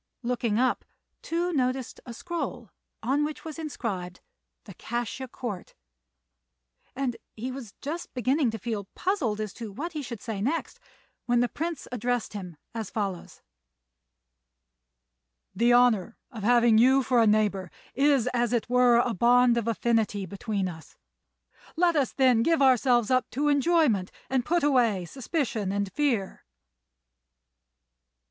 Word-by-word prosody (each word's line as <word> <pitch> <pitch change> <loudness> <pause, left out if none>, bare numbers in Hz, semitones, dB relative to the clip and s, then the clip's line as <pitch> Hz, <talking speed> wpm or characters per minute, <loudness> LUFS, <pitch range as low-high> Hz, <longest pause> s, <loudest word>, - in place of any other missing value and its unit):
Looking 235 -3 0
up, 255 +2 +1 0.4
Tou 345 +2 -1
noticed 255 -3 -1
a 240 - -6
scroll, 275 - -5 0.3
on 275 +5 +1
which 300 +1 -5
was 320 0 -7
inscribed, 195 - -4 0.4
The 200 - -11
Cassia 240 +6 -4
Court, 225 -6 -7 1.2
and 255 -3 -2 0.2
he 245 +4 -4
was 255 -6 -9
just 320 +5 -5
beginning 255 +2 +2
to 225 - -4
feel 220 -4 -4
puzzled 285 - -1
as 215 -2 -4
to 225 -3 -7
what 300 - -5
he 305 - -3
should 245 -5 -7
say 210 -2 -5
next, 325 - -2 0.5
when 240 0 +3
the 245 - +3
Prince 330 +5 -4
addressed 245 -1 -2
him 180 -6 -7 0.2
as 220 -3 -4
follows: 195 -5 -4 2.1
"The 235 +5 +3
honour 240 -4 +3
of 225 -4 -8
having 235 0 +5
you 260 +3 +5
for 245 -2 +3
a 225 - +4
neighbour 210 -3 +1 0.2
is, 275 -3 +3
as 240 0 +1
it 235 - 0
were, 250 -1 +5
a 240 0 +2
bond 240 +3 +4
of 235 -1 -1
affinity 225 -3 0
between 200 +1 -3
us. 160 -3 -10 0.8
Let 340 0 +3
us, 280 -4 +1
then, 255 -4 +3
give 330 +6 +2
ourselves 250 -3 +4
up 255 -1 +2
to 290 +4 0
enjoyment, 285 - +2 0.2
and 260 -2 +2
put 345 +4 +1
away 235 -10 +2
suspicion 250 - -2
and 200 -1 -2
fear." 250 -10 -1
240 Hz, 140 wpm, -27 LUFS, 215-270 Hz, 2.1 s, having